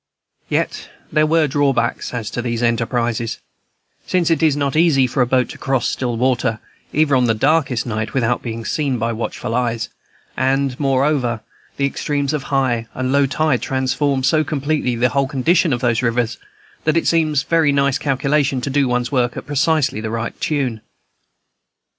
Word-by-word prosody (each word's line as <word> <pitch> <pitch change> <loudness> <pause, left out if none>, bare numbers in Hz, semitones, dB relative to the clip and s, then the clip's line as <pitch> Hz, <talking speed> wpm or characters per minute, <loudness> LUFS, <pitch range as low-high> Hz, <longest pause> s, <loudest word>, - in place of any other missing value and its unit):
Yet - - -2 0.2
there 155 0 +3
were 160 0 +3
drawbacks 135 -4 0
as 115 -4 -4
to 120 - -3
these 120 -1 -2
enterprises, 115 0 0 0.7
since 175 -2 +1
it 165 - +2
is 155 -3 +3
not 140 -1 -1
easy 155 -5 +4
for 125 +2 0
a 125 - +3
boat 125 0 +2
to - - -10
cross 135 -3 0
still 120 -3 -2
water, 120 -2 +1 0.3
even 150 -2 +2
on 125 -1 +3
the 115 -1 +2
darkest 135 -1 +1
night, 110 -1 -3
without 120 -2 +1
being 115 -1 -5
seen 140 -5 -1
by 115 +1 -1
watchful 115 0 -4
eyes; 120 -2 -1 0.5
and, 135 0 0
moreover, 135 -4 +1 0.4
the 140 - +1
extremes 140 +1 -1
of 150 - -1
high 125 -5 0
and 130 0 -1
low 140 0 +3
tide 140 -1 +1
transform 130 +1 0
so 155 +3 +3
completely 145 -3 -1
the 120 +2 +2
whole 140 +1 +1
condition 155 +5 +2
of 120 -1 -1
those 115 -3 +1
rivers 120 -1 0 0.4
that 155 +1 +2
it 165 - +2
needs 155 -3 +2
very 160 0 +2
nice 140 -1 +1
calculation 140 0 +1
to 140 - -3
do 140 -1 +2
one's 125 0 -1
work 125 -3 0
at - - -6
precisely 145 -3 +1
the 110 - -3
right 115 +1 -4
tune. 130 -8 -1
130 Hz, 175 wpm, -19 LUFS, 120-145 Hz, 0.7 s, easy